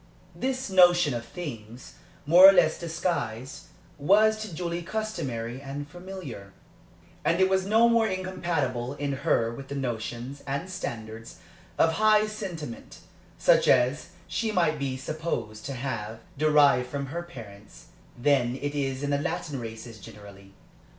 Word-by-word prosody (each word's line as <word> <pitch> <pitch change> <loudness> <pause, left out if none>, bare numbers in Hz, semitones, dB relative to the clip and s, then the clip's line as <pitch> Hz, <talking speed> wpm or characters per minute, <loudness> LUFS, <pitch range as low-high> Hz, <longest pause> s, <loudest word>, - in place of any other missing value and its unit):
This 260 0 -2
notion 175 -5 +5
of 120 -1 -3
things, 120 - -8 0.3
more 180 +6 +9
or - - +9
less 165 -4 +3
disguised, 160 -7 -3 0.3
was 215 +8 +4
to 215 -3 -6
Julie 170 +1 -3
customary 145 - -4
and 145 +1 -6
familiar; 175 - -9 0.7
and 170 +1 +1
it 190 - +5
was 190 0 +1
no 225 +3 +5
more 230 -1 +3
incompatible 170 - -2
in 145 -1 -3
her 125 -4 +1
with 135 +3 -9
the 140 - -6
notions 120 +1 -4
and 140 +7 -3
standards 115 - -7 0.4
of 160 - +4
high 215 +3 +4
sentiment, 170 - -7 0.4
such - - +4
as 130 +6 +3 0.2
she 225 -1 -1
might 170 -6 +1
be 135 -2 -2
supposed 140 -7 -4
to 140 - -4
have 115 -4 -5
derived 145 -4 +4
from 140 +1 -3
her 165 +6 -5
parents, 110 -11 -12 0.3
than 125 -2 +2
it 145 +2 -4
is 135 -1 -2
in 145 - -1
the 140 - +1
Latin 145 -2 -3
races 115 -1 -8
generally. 100 -2 -13
145 Hz, 145 wpm, -27 LUFS, 120-175 Hz, 0.7 s, more